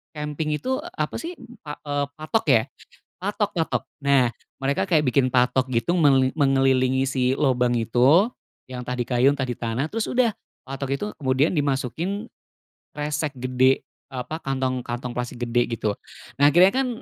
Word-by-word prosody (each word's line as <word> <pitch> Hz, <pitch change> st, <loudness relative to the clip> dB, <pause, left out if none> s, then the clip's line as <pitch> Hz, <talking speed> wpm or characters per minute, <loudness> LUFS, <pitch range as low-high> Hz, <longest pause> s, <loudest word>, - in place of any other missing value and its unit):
kemping 150 Hz, 0 st, -2 dB
itu 260 Hz, +9 st, -2 dB, 0.2 s
apa -, -, -2 dB
sih, 345 Hz, +2 st, -6 dB, 0.3 s
pa 150 Hz, -1 st, -7 dB
eee, 145 Hz, -1 st, -1 dB
patok 155 Hz, +9 st, -1 dB
ya, 115 Hz, -5 st, +5 dB, 0.5 s
patok 205 Hz, +2 st, -2 dB
patok. 165 Hz, -1 st, 0 dB, 0.2 s
Nah, 140 Hz, -3 st, +4 dB, 0.3 s
mereka 140 Hz, +8 st, 0 dB
kayak 155 Hz, -7 st, +2 dB
bikin 130 Hz, 0 st, +2 dB
patok 130 Hz, +1 st, +2 dB
gitu, 115 Hz, +9 st, +1 dB
menge 135 Hz, -5 st, +4 dB
mengelilingi 135 Hz, -2 st, +2 dB
si 130 Hz, -1 st, +1 dB
lubang 125 Hz, -3 st, +2 dB
itu, 125 Hz, -, +4 dB, 0.4 s
yang 125 Hz, -1 st, -6 dB
tadi 125 Hz, 0 st, -2 dB
kayu, 125 Hz, +2 st, +4 dB
tadi 130 Hz, -3 st, -2 dB
tanah 120 Hz, +5 st, -2 dB
terus 220 Hz, +5 st, -2 dB
udah, 245 Hz, -4 st, +2 dB, 0.3 s
patok 135 Hz, 0 st, -4 dB
itu 205 Hz, -, -3 dB
kemudian 135 Hz, +3 st, +1 dB
dimasukin 150 Hz, -, -2 dB, 0.7 s
kresek 150 Hz, 0 st, -2 dB
gede, 130 Hz, +1 st, +2 dB, 0.2 s
apa 135 Hz, +4 st, -5 dB
kantong, 130 Hz, -3 st, -1 dB
kantong 120 Hz, +1 st, -4 dB
plastik 120 Hz, 0 st, -4 dB
gede, 120 Hz, 0 st, +1 dB
gitu. 110 Hz, -2 st, -1 dB, 0.5 s
Nah, 145 Hz, -, +7 dB
akhirnya 185 Hz, +4 st, +7 dB
kan 265 Hz, +2 st, 0 dB
135 Hz, 150 wpm, -24 LUFS, 125-155 Hz, 0.7 s, Nah